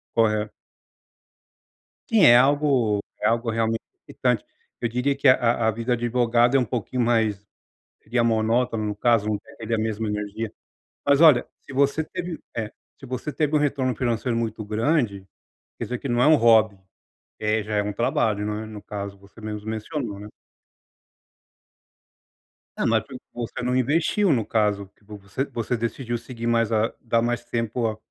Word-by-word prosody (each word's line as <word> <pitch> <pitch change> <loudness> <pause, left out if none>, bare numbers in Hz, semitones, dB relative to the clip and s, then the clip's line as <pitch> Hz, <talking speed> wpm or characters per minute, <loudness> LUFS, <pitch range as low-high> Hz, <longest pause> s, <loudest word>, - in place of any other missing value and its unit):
Correto. 110 -2 +2 1.6
Sim, 225 -3 +4
é 120 0 +9
algo 130 -6 +3 0.2
é - - +2
algo 115 +1 +1
realmente 115 0 0 0.3
excitante, - - -1 0.4
eu 115 - 0
diria 125 +4 0
que 140 - -11
a 120 -3 +4
a - - +4
vida 115 +3 -1
de 120 0 -3
advogado 120 +1 +3
é - - +6
um 125 - +1
pouquinho 125 +2 -2
mais 110 -4 +1 0.6
seria 120 +2 0
monótona, 115 0 +1
no 105 -1 -2
caso, 115 -1 +2
não 105 -1 0 0.2
é 110 - -6
da 115 0 0
mesma 110 0 -2
energia, 105 +1 -4 0.5
mas 140 0 +4
olha, 155 -6 +7 0.2
se 135 - -12
você 140 +3 +2
teve, 175 +1 -6 0.2
eh, 110 -1 -3 0.3
você 130 +3 -4
teve 150 0 0
um - - +4
retorno 130 -4 0
financeiro 120 0 -1
muito 110 -1 -3
grande, 110 -3 0 0.5
quer - - -4
dizer 125 - -3
que - - -5
não 120 +1 +2
é - - +5
um 155 - +7
hobby, 110 -5 +4 0.6
eh, 110 0 +1
já 105 +1 -4
é 105 - +2
um 105 0 -3
trabalho, 115 -4 0
não 105 0 -2
é, - - -6
no 105 -2 -9
caso, 100 -1 -6
você 100 +3 -18
mesmo 105 0 -6
mencionou, 110 -1 -4
né. 105 - -9 2.5
É, - - 0
mas - - +2
porque 250 - -10
você 120 0 -5
não 125 +1 0
investiu, 160 - +2
no 115 -4 +1
caso, 105 -3 0
você 105 +5 -5
você 120 -1 -3
decidiu 120 +1 -3
seguir 115 0 -7
mais 115 -1 +2
a 110 +1 +2
dar 115 -1 +1
mais 120 0 -1
tempo 115 0 -2
a 110 - -3
115 Hz, 170 wpm, -24 LUFS, 110-125 Hz, 2.5 s, é